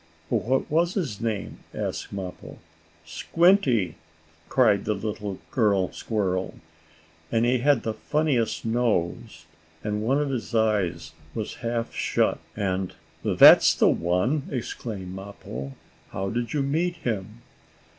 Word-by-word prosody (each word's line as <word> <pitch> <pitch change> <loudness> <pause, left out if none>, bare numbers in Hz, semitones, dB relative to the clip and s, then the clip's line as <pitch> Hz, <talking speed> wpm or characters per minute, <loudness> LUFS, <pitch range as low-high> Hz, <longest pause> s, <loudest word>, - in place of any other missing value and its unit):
"What 130 +3 +1
was 170 +3 +2
his 140 - -2
name?" 110 -3 -3 0.2
asked - - -4
Mappo. 95 -2 -7 0.5
"Squinty!" 130 - +2 0.5
cried 105 -6 +3
the 105 - 0
little 105 -1 -4
girl 100 -6 +2
squirrel. 95 -4 -2 0.8
"And 115 +1 +2
he 125 +1 +2
had 140 -1 +3
the 110 - -1
funniest 130 0 0
nose, 110 -5 -1 0.4
and 105 0 -2
one 130 +6 +2
of 145 -2 -1
his 125 -2 -4
eyes 100 -7 +1 0.2
was 110 -2 -4
half 115 -1 -2
shut, - - +1 0.2
and 95 -2 -2 0.2
" - - -32
"That's - - +8
the - - +4
one!" 90 - 0
exclaimed 110 -7 -5
Mappo. 95 -9 -7 0.4
"How 95 0 -3
did 120 -1 -2
you 145 -2 0
meet 165 +6 0
him?" 110 - -4
110 Hz, 125 wpm, -25 LUFS, 95-125 Hz, 0.8 s, That's